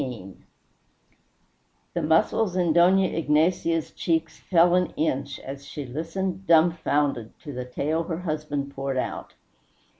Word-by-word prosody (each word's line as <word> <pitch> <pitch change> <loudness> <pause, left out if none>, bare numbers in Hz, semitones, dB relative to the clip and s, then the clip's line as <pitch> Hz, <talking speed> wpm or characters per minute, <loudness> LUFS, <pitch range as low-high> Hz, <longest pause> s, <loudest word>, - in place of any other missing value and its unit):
XVII 115 -8 -7 1.6
The - - -1
muscles 175 +5 +2
in 175 -3 +2
Dona 185 +3 +5
Ignacia's 165 0 +1
cheeks 165 -1 -1
fell 175 -1 +3
an 180 -1 +1
inch 140 -3 -1
as 135 +1 -8
she 145 - -6
listened, 175 +7 -4
dumbfounded, 155 -7 +2
to 145 -3 -8
the 125 0 -5
tale 150 +6 -1
her 165 0 -4
husband 150 -4 -3
poured 135 -1 -3
out. - - -4
160 Hz, 125 wpm, -25 LUFS, 140-175 Hz, 1.6 s, Dona